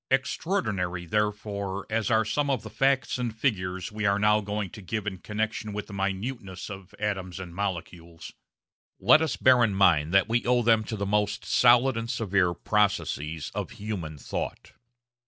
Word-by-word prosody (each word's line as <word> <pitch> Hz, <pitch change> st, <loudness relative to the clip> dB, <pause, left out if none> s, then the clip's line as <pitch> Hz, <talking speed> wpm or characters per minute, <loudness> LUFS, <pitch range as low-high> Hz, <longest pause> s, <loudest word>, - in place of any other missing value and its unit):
Extraordinary, 110 Hz, -, -1 dB
therefore, 100 Hz, -1 st, -2 dB
as 110 Hz, +1 st, -1 dB
are 110 Hz, -1 st, +3 dB
some 145 Hz, +7 st, 0 dB
of 130 Hz, -5 st, 0 dB
the -, -, -9 dB
facts 135 Hz, -2 st, +1 dB
and 115 Hz, -3 st, -3 dB
figures 95 Hz, -7 st, -1 dB
we 105 Hz, 0 st, -5 dB
are 100 Hz, 0 st, +3 dB
now 105 Hz, +1 st, +3 dB
going 105 Hz, -2 st, -3 dB
to 105 Hz, -, -10 dB
give 110 Hz, +3 st, -4 dB
in 95 Hz, -3 st, -4 dB
connection 110 Hz, +1 st, -3 dB
with 105 Hz, 0 st, -4 dB
the 100 Hz, -, -11 dB
minuteness 100 Hz, 0 st, -4 dB
of 95 Hz, -1 st, -10 dB
atoms 95 Hz, -3 st, -3 dB
and 90 Hz, -3 st, -8 dB
molecules, 85 Hz, -3 st, -5 dB, 0.7 s
let 130 Hz, +11 st, +6 dB
us 160 Hz, -, 0 dB
bear 130 Hz, -2 st, +5 dB
in 105 Hz, -4 st, +1 dB
mind 85 Hz, -6 st, +4 dB
that 95 Hz, 0 st, +4 dB
we 115 Hz, +2 st, +1 dB
owe 125 Hz, 0 st, +2 dB
them 115 Hz, -1 st, +4 dB
to 110 Hz, -, -4 dB
the 100 Hz, -1 st, -2 dB
most 105 Hz, +1 st, 0 dB
solid 125 Hz, +1 st, +5 dB
and 115 Hz, 0 st, -4 dB
severe 95 Hz, -7 st, +1 dB
processes 80 Hz, -7 st, -1 dB
of -, -, -3 dB
human 95 Hz, -8 st, -5 dB
thought. -, -, -5 dB
105 Hz, 175 wpm, -27 LUFS, 95-115 Hz, 0.7 s, let